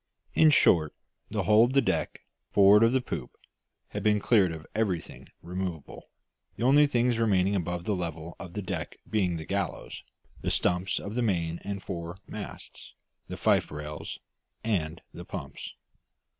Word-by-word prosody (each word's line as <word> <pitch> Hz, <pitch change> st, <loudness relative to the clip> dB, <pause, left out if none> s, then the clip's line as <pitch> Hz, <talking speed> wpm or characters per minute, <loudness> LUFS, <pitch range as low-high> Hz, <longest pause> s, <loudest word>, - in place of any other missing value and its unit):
In 160 Hz, -, +6 dB
short, 80 Hz, -, +4 dB, 0.3 s
the -, -, -1 dB
whole 105 Hz, +1 st, +6 dB
of 125 Hz, -, -2 dB
the 135 Hz, -, +5 dB
deck, -, -, -1 dB, 0.3 s
forward 100 Hz, +1 st, +6 dB
of 115 Hz, 0 st, +5 dB
the 130 Hz, 0 st, +2 dB
poop, 75 Hz, -, -6 dB, 0.5 s
had -, -, -4 dB
been 105 Hz, -1 st, +3 dB
cleared 100 Hz, -4 st, +3 dB
of 80 Hz, -1 st, -8 dB
everything 100 Hz, -6 st, -2 dB, 0.2 s
removable, 90 Hz, -3 st, -5 dB, 0.5 s
the -, -, -4 dB
only 145 Hz, +4 st, +6 dB
things 120 Hz, -3 st, +1 dB
remaining 100 Hz, -3 st, +2 dB
above 90 Hz, -1 st, -2 dB
the 105 Hz, +2 st, 0 dB
level 85 Hz, -2 st, -5 dB
of 90 Hz, -2 st, -8 dB
the 105 Hz, -, -4 dB
deck -, -, -4 dB
being 95 Hz, -6 st, 0 dB
the 80 Hz, -, -7 dB
gallows, 100 Hz, -5 st, -3 dB, 0.4 s
the -, -, -1 dB
stumps 90 Hz, +2 st, +1 dB
of 100 Hz, -, -6 dB
the 125 Hz, -, 0 dB
main 85 Hz, -7 st, 0 dB
and 100 Hz, -1 st, -5 dB
fore 85 Hz, -1 st, -5 dB
masts, 105 Hz, -2 st, -9 dB, 0.3 s
the -, -, -6 dB
fife -, -, +2 dB
rails, 75 Hz, 0 st, -6 dB, 0.5 s
and 85 Hz, -8 st, -1 dB
the -, -, -8 dB
pumps. -, -, -7 dB
95 Hz, 160 wpm, -28 LUFS, 85-110 Hz, 0.5 s, In